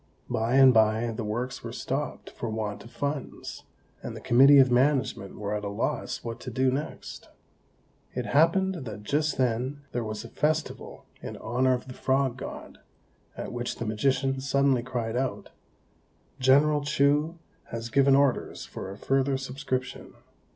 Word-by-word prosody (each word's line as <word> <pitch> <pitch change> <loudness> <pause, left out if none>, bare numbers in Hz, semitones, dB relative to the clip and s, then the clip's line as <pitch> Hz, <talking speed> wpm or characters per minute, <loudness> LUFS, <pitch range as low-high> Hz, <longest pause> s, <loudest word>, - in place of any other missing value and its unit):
By 115 +3 +1
and 135 -1 +8
by 110 +1 +3
the 115 +1 -4
works 120 +4 -3
were - - -5
stopped - - -4
for 120 - -5
want 110 -2 -4
of 115 - -12
funds, 140 +1 -5 0.4
and - - -6
the - - -7
committee 135 +4 +6
of 130 -2 +6
management 130 -6 +1
were 105 0 -3
at 105 0 -2
a 100 - -2
loss 100 - -2
what 115 0 -5
to 130 - -7
do 130 +2 +1
next. 140 +4 -6 0.9
It - - -2
happened 170 +1 +2
that 105 -2 -7
just 150 +6 0
then 130 +3 0
there 120 - -2
was 110 0 -5
a - - -9
festival 155 +4 -2 0.2
in - - -7
honour 125 +3 +1
of 125 - -8
the 130 - -7
Frog 130 -1 +1
God, 130 - -8 0.6
at - - -5
which 120 0 -3
the 115 - -5
magician 135 +4 0
suddenly 140 -2 +2
cried 120 -2 -3
out, 130 +1 -2 0.9
"General 145 +3 +4
Chou 150 +3 +2 0.3
has 115 0 -6
given 140 +1 +5
orders 140 -2 +1
for - - -7
a 100 - -8
further 135 +3 +1
subscription. 130 -1 -4
130 Hz, 160 wpm, -27 LUFS, 115-140 Hz, 0.9 s, and